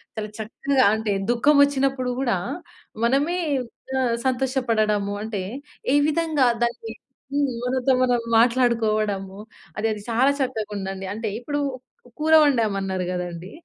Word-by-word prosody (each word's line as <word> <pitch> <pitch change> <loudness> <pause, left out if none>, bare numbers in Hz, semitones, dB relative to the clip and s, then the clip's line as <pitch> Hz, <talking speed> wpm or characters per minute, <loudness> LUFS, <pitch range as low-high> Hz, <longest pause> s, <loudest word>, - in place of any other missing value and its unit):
చాలా 215 -1 -4
చక్కగా 260 +5 +1
అంటే, 220 -2 -1 0.2
దుఃఖం 285 +5 +3
ఒచ్చినప్పుడు 270 -2 -1
గూడా 240 -9 +1 0.7
మనమే 290 +9 +1 0.6
ఆహ్, 240 -2 +1
సంతోషపడడము 230 -6 0
అంటే 210 -4 -3 0.5
ఏ - - +5
విధంగా 310 -5 +2 0.2
దాన్ని 235 -2 -5 0.4
హ్మ్. 285 -1 +2 0.2
మనతో 260 +1 +1
మనం 245 -1 +2 0.2
మాట్లాడుకోవడము. 215 -5 +1 0.4
అది 220 +1 0
అది 210 - -8
చాలా 260 +5 +4
చక్కగా 225 -5 -2
ఉందండి. 195 0 -5
అంటే 225 0 -4
ఇప్పుడు 290 +4 -3 0.6
కూర 315 +1 +2
వండామన్నారు 195 -8 +1
గదండీ! 180 +1 -5
235 Hz, 120 wpm, -23 LUFS, 210-265 Hz, 0.7 s, ఏ